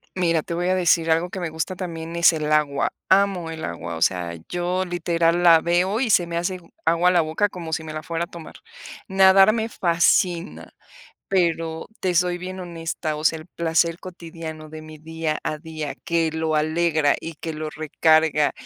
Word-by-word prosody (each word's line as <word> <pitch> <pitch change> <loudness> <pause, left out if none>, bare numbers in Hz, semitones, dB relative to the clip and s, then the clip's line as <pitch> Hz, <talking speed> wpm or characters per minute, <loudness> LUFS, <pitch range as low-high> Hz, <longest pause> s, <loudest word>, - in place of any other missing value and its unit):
Mira, 170 -4 +1
te 170 - -5
voy 175 +1 -1
a 185 - +2
decir 170 -2 +2
algo 165 +2 +1
que 190 - -5
me 175 -3 -3
gusta 160 +4 -4
también 165 -2 -6
es 170 0 +5
el 155 -1 -2
agua. 145 -2 +1 0.2
Amo 190 -3 +2
el 160 -1 -5
agua. 85 0 -5
O 80 - -7
sea, 85 -2 0
yo 180 +1 -1
literal 170 -1 0
la 165 -2 +7
veo 180 +6 +1
y 240 -5 +1
se 175 -3 +3
me 170 0 -3
hace 180 +2 -2 0.3
agua 170 +2 +3
la 175 -1 +4
boca 160 +6 0
como 165 -4 -7
si 160 - -2
me 155 -1 -7
la 155 -1 -5
fuera 165 +1 -3
a - - -23
tomar. 170 -2 -11 0.5
Nadar 195 +1 +6
me 225 0 -2
fascina, 175 0 0 0.5
pero 165 -3 0
te 185 -1 0
soy 175 0 +1
bien 185 +1 -7
honesta. 165 -2 -4
O 150 - -7
sea, 160 0 +2
el 155 - -12
placer 170 0 0
cotidiano 165 -3 -9
de 155 0 -9
mi 155 0 -11
día 160 0 -3
a 155 - -3
día 155 -3 -6
que 165 -1 +1
lo 160 -1 -1
alegra, 155 -1 +2
y 165 -1 -7
que 160 +1 -6
lo 155 0 -5
recarga, 155 0 +2
165 Hz, 195 wpm, -23 LUFS, 155-175 Hz, 0.5 s, la